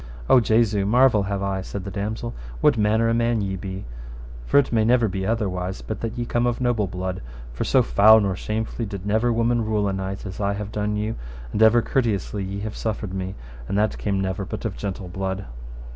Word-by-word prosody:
O 130 - +7
Jesu, 110 -3 +2
marvel 120 +1 +4
have 100 0 -2
I, 95 -1 -1
said 95 +1 -6
the 100 - -6
damosel, 110 +4 -3 0.3
what - - +4
manner 110 +1 +2
a 115 - +2
man 115 0 +2
ye 95 -2 -2
be, 95 +1 -6 0.6
for - - +3
it 140 -3 +3
may 110 -1 +3
never 120 0 +4
be 95 -1 -3
otherwise 95 -5 -2
but 110 - -5
that 115 +1 -4
ye 120 - -1
be - - -4
come 120 +1 +1
of 120 - -1
a - - -2
noble 115 -5 +1
blood, 90 +1 -4 0.3
for - - -2
so - - +4
foul 105 - +7
nor 100 -3 0
shamefully 110 +3 -3
did 100 -2 -6
never 110 +4 +2
woman 115 0 +1
rule 105 -2 0
a 100 - 0
knight 95 +1 -4
as 95 0 -6
I 100 0 +1
have 105 0 -5
done 105 0 -1
you, 105 +2 -2 0.3
and 105 - -1
ever 110 +1 +6
courteously 105 -5 -1
ye 100 +1 -4
have 110 0 -4
suffered 105 -3 -3
me, 95 0 -4 0.3
and 100 - -1
that 105 +1 +1
came 100 -2 -1
never 95 0 -2
but - - -6
of - - -1
a - - -13
gentle 95 +4 -4
blood. 95 +1 -3
105 Hz, 230 wpm, -23 LUFS, 95-115 Hz, 0.6 s, O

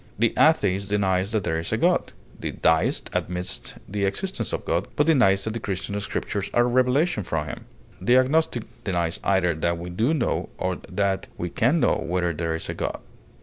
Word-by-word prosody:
The 115 +2 +2
atheist 100 -11 +3
denies 95 -1 +1
that 110 -3 0
there 80 -2 0
is 85 - -4
a - - +1
God; - - +2 0.3
the - - -3
deist 80 -1 +1
admits 90 0 -1
the 100 0 -1
existence 120 - -2
of - - -3
God, 85 +4 0
but 150 - +3
denies 110 -12 +4
that 110 - -3
the 115 - -3
Christian 100 0 -3
Scriptures 100 0 -3
are 120 - +5
a - - +2
revelation 125 - +2
from - - -2
him; - - -7 0.4
the 120 +7 +4
agnostic 130 -2 +2 0.2
denies 85 -4 -1
either 95 -3 +2
that 85 +2 -1
we 85 +1 -6
do 115 - +1
know 130 - -1
or - - -1
that 100 -1 0
we 90 -1 -4
can 130 - +2
know - - +3
whether 90 0 -1
there 80 +1 -2
is 80 - -5
a - - -3
God. - - -3
100 Hz, 195 wpm, -24 LUFS, 90-120 Hz, 0.4 s, are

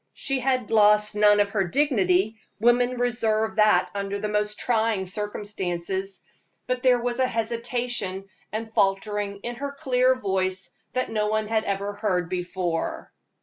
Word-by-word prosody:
She 270 -1 -2
had 255 -3 0
lost 210 -1 +4
none 210 0 +5
of 205 0 +2
her 200 -2 +1
dignity 210 - +1 0.2
women 245 +2 +3
reserve 220 -2 0
that 215 0 +4
under 200 0 -3
the 210 - -3
most 210 0 -1
trying 220 -4 +1
circumstances 195 -1 -4 0.4
but 255 0 -2
there 250 -2 +4
was 240 +1 -2
a 260 - +3
hesitation 230 -4 -3 0.2
and 220 +1 -5
faltering 200 0 0
in 240 0 -4
her 280 +1 -4
clear 260 -2 +2
voice 190 -5 -1 0.4
no 215 -1 -1
one 215 0 0
had 220 0 0
ever 200 +1 -2
heard 180 -5 -1
before. 180 -2 -3
210 Hz, 145 wpm, -25 LUFS, 195-240 Hz, 0.4 s, none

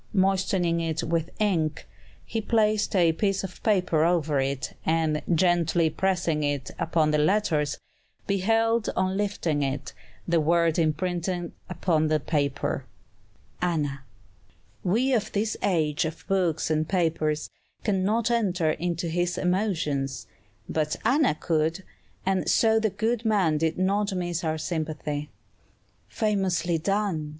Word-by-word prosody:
Moistening 190 -3 +2
it 165 0 -2
with 165 0 -1
ink, 165 -8 0 0.4
he 225 - -2
placed 215 -2 +1
a 170 -3 +5
piece 195 +2 0
of 185 -2 -7
paper 180 -8 +2
over 160 -4 +2
it, 135 -1 -2
and, 160 -1 +1
gently 170 -1 +2
pressing 170 -4 0
it 145 -2 -2
upon 160 -2 +2
the 150 - +2
letters, 155 -3 +1 0.5
beheld, 225 +3 +1
on 185 0 0
lifting 195 -7 -1
it, 135 0 -3 0.3
the 170 -1 +3
word 170 +1 +2
imprinted 175 +2 -1 0.2
upon 165 -3 +1
the 155 0 +2
paper. 140 -2 -1 0.8
[Illustration: 170 -4 +1
Anna] 140 -1 -6 0.8
We 240 +9 +2
of 215 -3 0
this 215 +2 0
age 160 -5 +1
of 160 +1 -6
books 175 -5 +1
and 155 0 0
papers 160 -4 0 0.3
cannot 210 +3 +1
enter 185 -9 +1
into 170 +2 -2
his 175 +1 -1
emotions. 170 -8 -1 0.4
But 155 -1 -1
Anna 260 - +3
could, 160 +3 0 0.4
and 190 -3 +1
so 225 -1 +4
the 220 0 +1
good 220 +4 -1
man 190 -9 +2
did 160 0 0
not 200 +2 +1
miss 175 -1 -2
our 160 -1 0
sympathy. 155 -2 -3 0.8
"Famously 190 -5 0
done!" 195 -4 -1
175 Hz, 130 wpm, -26 LUFS, 155-195 Hz, 0.8 s, a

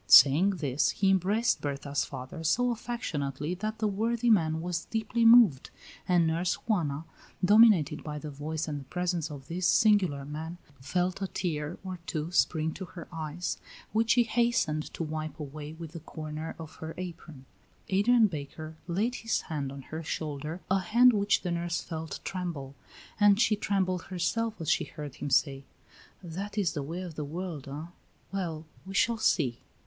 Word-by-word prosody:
Saying 150 +8 +8
this, 145 -4 +1
he 195 -1 +2
embraced 205 +6 +2
Berta's 140 0 -1
father 135 +5 -7
so 245 +10 +2
affectionately 160 - -3
that 215 +4 -3
the 215 - +1
worthy 230 +4 +1
man 160 -6 +3
was 175 0 -3
deeply 225 +1 0
moved, 225 - +7 0.4
and 175 -2 +4
Nurse 170 +3 +1
Juana, 160 -8 -1 0.4
dominated 200 -8 +6
by 150 -1 -5
the 150 0 -6
voice 155 +3 -4
and 145 -2 -3
the - - -9
presence 175 0 -1
of 140 -3 -9
this 180 +2 0
singular 185 -10 +4
man, 160 +4 -6 0.2
felt 180 +7 -1
a 195 - 0
tear 155 -3 -3
or 185 -2 -5
two 155 +2 -3
spring 160 -3 +2
to 190 - -6
her 175 -1 -10
eyes, 160 +2 -3 0.3
which 225 +1 +1
she 245 - +5
hastened 230 -10 +1
to - - -2
wipe 155 -1 -4
away 150 +1 -7
with 160 -1 -8
the 165 - -7
corner 155 0 -6
of 160 -2 -10
her 160 0 -7
apron. 165 -6 -8 0.4
Adrian 225 +4 +5
Baker 155 -2 -5
laid 205 +8 0
his 225 - 0
hand 145 -5 -4
on 140 -1 -8
her 160 +4 -6
shoulder, 155 +1 -4
a 190 - +4
hand 240 +6 +5
which 200 -1 +2
the 180 - -1
nurse 170 0 -1
felt 160 -1 -6
tremble, 170 -8 -4 0.5
and 205 -1 +6
she 225 -2 +4
trembled 190 -4 0
herself 215 +5 -1
as 160 - -5
she - - +2
heard 145 -3 -8
him - - -4
say: 135 0 +2 0.6
"That 195 +5 -6
is 190 -6 +1
the 145 - -2
way 165 +6 -4
of 180 -3 -6
the 150 - -4
world, 160 -1 -5
eh? 150 +5 -7 0.4
Well, 165 -5 -3 0.2
we 195 +1 -8
shall 230 +2 +3
see." 130 - +2
170 Hz, 175 wpm, -29 LUFS, 150-195 Hz, 0.6 s, Saying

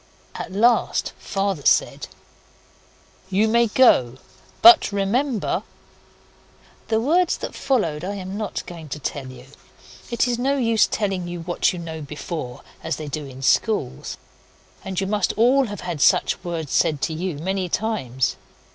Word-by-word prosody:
At - - -6
last 230 +5 +2
Father 195 -5 -2
said - - +2 1.2
'You 200 +3 +2
may 235 +1 +3
go 130 - +4 0.5
but 350 -7 +8
remember 215 +4 0 0.6
' - - -30
The 220 0 +1
words 335 +9 +2
that - - -6
followed 175 - -1
I 200 +2 -3
am 190 0 -6
not 215 -1 -4
going 165 -3 -9
to 150 - -5
tell 140 -1 -4
you. 130 -1 -11 0.6
It 235 +1 +1
is 240 -1 -1
no 275 +3 +1
use 230 -4 +3
telling 195 -4 -2
you 175 -1 -6
what 175 +1 0
you 180 - -6
know 160 -2 -6
before 150 -3 -6 0.2
as 160 -2 -2
they 155 +1 -7
do 150 0 -5
in 135 0 -10
schools. 205 - 0 0.7
And 190 -1 -3
you 195 - -1
must 205 -1 0
all 250 +4 +3
have 205 -2 -7
had 170 -5 -4
such - - +3
words 165 -5 -4
said 150 -2 +2
to 160 - 0
you 170 -1 -3
many 185 +3 -2
times. 160 - -1
190 Hz, 155 wpm, -22 LUFS, 155-225 Hz, 1.2 s, but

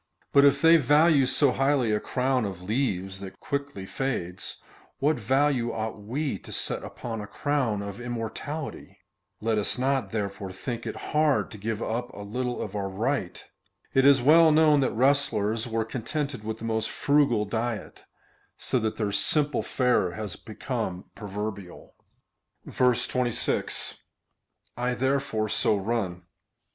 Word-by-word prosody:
But 140 0 +7
if 140 +1 +4
they 165 +1 +8
value 150 0 +4
so 130 +1 +4
highly 135 -3 +2
a 105 - +2
crown 130 +1 0
of 95 -4 -5
leaves 95 -4 -1
that 95 0 -9
quickly 140 -9 -4
fades, 95 -7 -3 0.4
what 150 0 +1
value 130 +1 +2
ought 110 -1 -4
we 125 +1 -2
to - - -12
set - - -1
upon 115 -3 -6
a 105 - -7
crown 130 -9 -1
of 100 +1 -7
immortality? 120 +6 -5 0.4
Let 110 0 +1
us 105 - -1
not, 135 +1 0
therefore, 100 -3 -4
think 115 +5 -5
it - - -4 0.2
hard 150 -2 +2
to 105 - -9
give 110 +2 -3
up 120 +2 -3
a 100 - -8
little 125 +4 -3
of 105 -1 -7
our 100 -1 -2
right. 110 0 -2 0.5
It 135 - +4
is 135 -2 +6
well 160 +3 +7
known 155 -1 +5
that 130 - +2
wrestlers 115 -4 +2
were 115 -1 -1
contented 130 +2 -3
Avith 110 +1 -4
the 115 - -7
most 110 -1 -1
frugal 140 -7 +2
diet, 115 +1 -4 0.5
so 130 - 0
that 110 -1 -1
their 105 -2 -1
simple 150 +7 +2
fare 125 -9 +1
has 105 -1 -4
become 110 -4 -5
proverbial. 100 -2 -6 0.8
26. 125 -1 0 0.6
/ - - -38
therefore 125 -2 0
so 105 0 +2
run. 95 -4 -2
120 Hz, 145 wpm, -27 LUFS, 105-140 Hz, 0.8 s, they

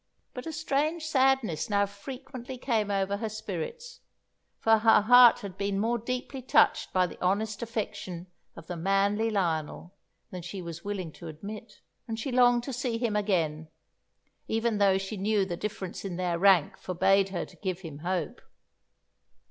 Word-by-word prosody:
But 250 +3 -7
a - - -3
strange 310 +1 -1
sadness 260 - +2
now 200 -1 +3
frequently 255 +5 -8
came 225 -5 0
over 200 0 0
her 220 +1 -3
spirits, 220 - -6 0.6
for 225 0 +4
her 225 0 +6
heart 245 +2 +7
had 195 -2 -8
been 200 -1 -1
more 235 +3 +1
deeply 255 +3 -4
touched 255 - +3
by 185 -1 +3
the 180 - -8
honest 205 +4 0
affection 205 -6 -4 0.3
of - - -11
the 175 - -5
manly 195 +5 +1
Lionel 175 -3 -2 0.4
than 180 - -6
she 180 +3 -7
was 170 -1 -7
willing 195 -5 -4
to 170 - -11
admit, 200 +8 -9 0.3
and 225 -1 -4
she 260 +4 -3
longed 245 -1 +4
to 270 - -5
see 245 -1 -2
him 230 -3 -1
again, 165 -7 0 0.8
even 225 -1 0
though 195 -1 +4
she 195 +2 -5
knew 200 0 +1
the 175 -2 -4
difference 190 -1 -5
in 190 -3 -4
their 175 -1 -1
rank 190 -5 +4
forbade 195 +2 +2
her 175 -3 -3
to - - -17
give 190 -2 -3
him 155 -5 -8
hope. 175 -1 -3
205 Hz, 165 wpm, -28 LUFS, 185-235 Hz, 0.8 s, heart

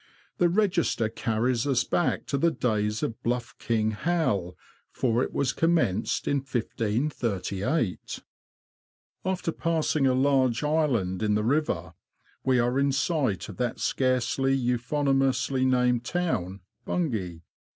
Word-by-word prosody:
The 175 - +4
register 175 - +1
carries 115 +3 0
us 130 -3 +2
back 175 - 0
to 140 - -1
the 170 - +4
days 110 -7 -1
of 115 - -3
Bluff 120 0 -2
King 110 -2 0
Hal, 105 - -1 0.3
for 120 -1 +1
it - - -1
was 135 -2 0
commenced 140 - +1
in 140 - +2
1538. 115 - -2 1.0
After 185 -3 -1
passing 160 -4 +1
a 130 - +3
large 130 -2 +2
island 135 - +1
in 105 -1 +2
the 105 - +1
river, 145 +7 0 0.5
we 130 -1 +3
are 125 +2 +2
in 140 0 +2
sight 135 - 0
of 100 -4 -9
that 120 -2 -2
scarcely 130 +1 +1
euphoniously 130 +1 +1
named 125 -2 +2
town, 105 - -2 0.2
Bun 170 -1 -1
gay. 90 -7 -4
125 Hz, 130 wpm, -27 LUFS, 110-145 Hz, 1.0 s, The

